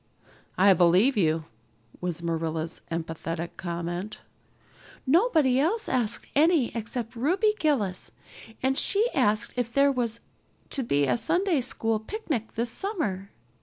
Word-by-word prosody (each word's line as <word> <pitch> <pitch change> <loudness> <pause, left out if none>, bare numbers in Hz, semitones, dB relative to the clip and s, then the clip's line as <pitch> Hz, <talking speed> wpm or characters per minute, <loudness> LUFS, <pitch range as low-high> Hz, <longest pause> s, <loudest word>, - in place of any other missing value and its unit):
"I 195 +1 +6
believe 180 +9 +4
you," 160 -5 +1 0.5
was 175 -2 -3
Marilla's 165 -1 -3
emphatic 165 +1 -4
comment. 175 +3 -4 0.9
"Nobody 300 - +3
else 385 +11 +1
asked 240 -4 0
any 305 -4 +3
except 230 +1 -4
Ruby 365 - +2
Gillis, 220 - 0 0.5
and 265 +1 +2
she 415 +4 +3
asked 210 +1 +1
if 245 -2 -2
there 280 +2 +4
was 235 -3 -2 0.5
to 275 - +1
be 145 - +1
a 125 -3 +1
Sunday 350 - +1
school 225 -3 0
picnic 270 - -4
this 235 +1 -2
summer. 250 - -3
230 Hz, 125 wpm, -26 LUFS, 175-280 Hz, 0.9 s, I